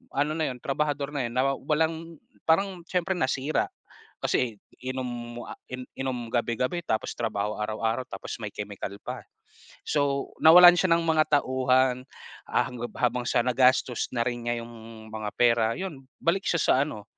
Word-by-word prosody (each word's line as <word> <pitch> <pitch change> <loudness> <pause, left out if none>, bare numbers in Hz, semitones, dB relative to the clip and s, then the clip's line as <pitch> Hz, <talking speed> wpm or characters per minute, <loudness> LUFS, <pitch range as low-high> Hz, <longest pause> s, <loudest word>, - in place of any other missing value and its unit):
ano 145 +2 +1
na 160 - +1
'yon, 125 - -6
trabahador 145 0 -1
na 135 -4 -1
'yon, 120 - -8
nawa 135 +2 +2
walang 160 +2 -1 0.3
parang 185 +2 +2
siyempre 180 +1 -1
nasira. 140 0 0 0.5
Kasi 115 -4 0 0.3
inom, 120 -2 -5
ah, - - -8 0.4
inom 130 -3 -3
gabi-gabi, 125 +8 0
tapos 110 - -1
trabaho 105 -2 -2
araw-araw, 110 +3 -1
tapos 95 - -6
may 105 - -4
chemical 100 -1 -6
pa. - - -5 0.6
So, 140 -2 0
nawalan 175 +2 +10
siya 185 -2 +3
ng 170 - 0
mga 160 -1 +3 0.2
tauhan, 130 -1 +2 0.4
ah, - - +2
hangga 120 -1 -5
habang 125 0 +1
sa - - +3
nagastos 125 -1 +2
na 120 - +1
rin 120 -1 -2
niya 120 0 0
'yong 120 0 -10 0.4
mga 110 -1 -4
pera. 115 -2 +4
'Yon 160 -8 -6 0.2
balik 185 +4 +1
siya 170 - +2
sa - - +4
ano, 105 -9 -7
130 Hz, 155 wpm, -27 LUFS, 120-155 Hz, 0.6 s, nawalan